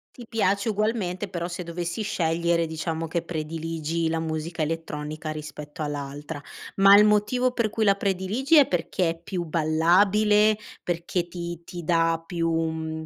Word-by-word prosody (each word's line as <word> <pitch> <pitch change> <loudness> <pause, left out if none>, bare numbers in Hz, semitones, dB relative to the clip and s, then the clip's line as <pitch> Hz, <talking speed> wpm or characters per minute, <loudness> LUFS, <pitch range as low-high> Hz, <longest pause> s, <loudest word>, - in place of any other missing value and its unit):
Ti 240 - -10
piace 200 -1 +1
ugualmente 205 -3 -1
però, 170 -2 -3
se 175 0 -5
dovessi 170 +3 -4
scegliere, 170 -4 +1
diciamo 160 0 -3
che 170 +1 -1
prediligi 165 0 -3
la 165 - 0
musica 160 +1 -3
elettronica 155 -1 -4
rispetto 150 +1 -6
all'altra. 145 0 -5 0.4
Ma 195 +1 +8
il 210 - +7
motivo 215 +5 +2
per 235 -3 0
cui 220 +1 -1
la 200 - +6
prediligi 200 - +1
è 285 - +7
perché 175 0 0
è 165 0 -10
più 175 0 -3
ballabile, 200 +7 +3 0.3
perché 175 0 -2
ti 170 -1 -6
ti 175 -1 -8
dà 165 0 +2
più, 165 -1 -1
mhmm, 160 -1 -2
170 Hz, 150 wpm, -25 LUFS, 160-200 Hz, 0.4 s, Ma